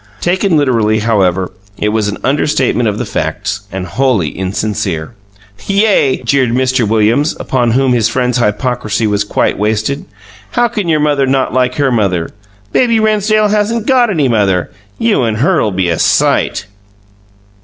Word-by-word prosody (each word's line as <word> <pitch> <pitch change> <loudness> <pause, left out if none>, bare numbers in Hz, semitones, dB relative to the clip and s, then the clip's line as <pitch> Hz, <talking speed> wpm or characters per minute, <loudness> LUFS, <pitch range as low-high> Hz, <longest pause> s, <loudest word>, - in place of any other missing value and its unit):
Taken 185 -1 +1
literally, 115 -7 +2
however, 95 -5 0 0.3
it 105 - 0
was 105 -1 0
an 105 - -3
understatement 135 -4 +1
of 105 - -3
the - - -3
facts 100 +1 -3
and 95 -1 -4
wholly 110 - 0
insincere. 95 -2 -3 0.5
"Yay!" 195 -11 +2
jeered 130 0 +1
Mr. 130 -1 +1
Williams, 115 +8 +1
upon 125 -3 0
whom 130 0 +2
his 115 -2 +2
friend's 125 +1 0
hypocrisy 120 0 -1
was 100 -1 0
quite 100 - -1
wasted. 110 +6 -1 0.5
"How 240 0 +2
can 210 -6 -3
your 155 -2 +2
mother 145 -2 +1
not 130 -2 0
like 125 0 +1
her 140 -2 +1
mother? 95 -8 0 0.4
Baby 235 -3 +2
Rennsdale 215 0 +2
hasn't 215 +2 0
got 250 -3 +3
any 155 -9 +1
mother! 100 -6 0 0.3
You 225 - +1
and 110 -3 -1
her'll 115 -3 +2
be 95 -2 -1
a 85 -2 -1
sight!" - - +1
125 Hz, 155 wpm, -13 LUFS, 105-150 Hz, 0.5 s, got